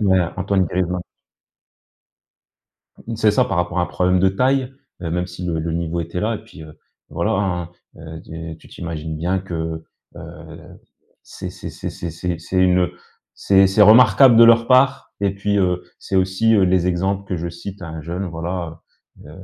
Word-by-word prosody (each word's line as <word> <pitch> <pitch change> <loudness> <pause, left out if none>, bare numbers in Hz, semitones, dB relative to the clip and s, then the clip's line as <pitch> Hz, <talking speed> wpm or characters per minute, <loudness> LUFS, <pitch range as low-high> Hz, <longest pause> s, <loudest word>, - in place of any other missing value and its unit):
Ouais, 95 -3 +3 0.2
Antoine 95 0 +1
Griezmann. 90 +1 -2 2.0
Mmh, 115 -1 -4
c'est 110 -1 +3
ça. 125 +4 +3
Par 115 - -3
rapport 90 +1 -1
à 90 - +2
un - - 0
problème 90 0 +1
de 95 - +4
taille. 130 +6 0 0.3
Et 85 -2 -4
même 90 +1 -1
si 90 0 -8
le 85 -2 -2
le 80 0 -3
niveau 85 0 -2
était 85 +2 -4
là 110 +2 0
et - - -5
puis, 90 -7 -14
heu, 75 -1 -14 0.3
voilà, 105 +7 -1
hein. 90 -4 -1 0.5
Tu 80 0 -8
tu - - -18
t'imagines 80 -2 -6
bien 90 +4 -1
que, 80 -3 -5 0.3
heu, - - -11 0.6
c'est - - -8
c’est - - -8
c’est - - -6
c’est 85 - -6
c’est 85 +1 -4
c’est 85 +3 -5
une 90 -1 +3 0.5
c’est 95 -1 +4
c’est 105 +2 +4
remarquable 115 +2 +7
de 115 - +9
leur 115 0 +5
part. 130 +1 +3
Et 100 -1 0
puis, 100 +1 -1
heu, 90 -1 +1 0.2
c'est 95 - -3
aussi, 95 +5 +2
heu, 100 - +4
les 90 -1 +2
exemples 95 +2 -1
que 90 - -2
je 85 +1 -4
cite 95 +3 -9
à 85 - -7
un 80 -1 -7
jeune, 90 +5 -4
voilà. 85 -1 -5 0.4
Heu, 75 - -12
90 Hz, 190 wpm, -20 LUFS, 85-100 Hz, 2.0 s, de